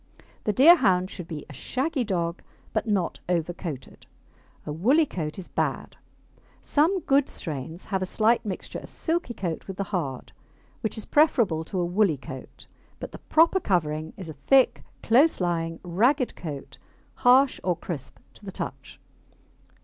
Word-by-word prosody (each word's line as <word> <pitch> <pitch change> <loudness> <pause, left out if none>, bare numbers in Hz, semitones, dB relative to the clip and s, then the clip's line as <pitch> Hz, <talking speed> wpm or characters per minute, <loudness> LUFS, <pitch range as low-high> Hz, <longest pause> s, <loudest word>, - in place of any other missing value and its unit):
The 210 - +2
Deerhound 200 - +5
should 180 -3 -7
be 155 -4 -6
a - - -11
shaggy 265 - -2
dog, 170 -5 -2 0.3
but 215 0 -1
not 195 -5 0
over 175 -1 0
coated. 160 -8 -8 0.6
A 150 - -4
woolly 250 - +3
coat 155 - -5
is 190 - -7
bad. - - -2 0.7
Some 340 +6 +2
good 280 -2 +2
strains 160 +2 -5
have 190 -2 -2
a 185 - -1
slight 225 +4 +2
mixture 200 -4 -5
of - - -12
silky 325 -7 -2
coat 170 -4 -4
with 190 -2 -6
the 200 - -1
hard, 140 -8 -3 0.5
which 220 - -3
is 220 - -4
preferable 230 - +3
to 185 - -3
a 175 - +1
woolly 180 -3 +2
coat, 130 0 -10 0.3
but - - -7
the - - -10
proper 335 +4 +4
covering 155 - -1
is 185 -4 -7
a 160 - -6
thick, 250 - +3 0.2
close 270 +8 +4
lying, 165 -2 -1
ragged 240 - +2
coat, 145 -5 -7 0.4
harsh 255 +2 +5
or 180 -2 +1
crisp 160 -7 -6 0.2
to - - -18
the - - -6
touch. - - -7
185 Hz, 160 wpm, -26 LUFS, 165-250 Hz, 0.7 s, Deerhound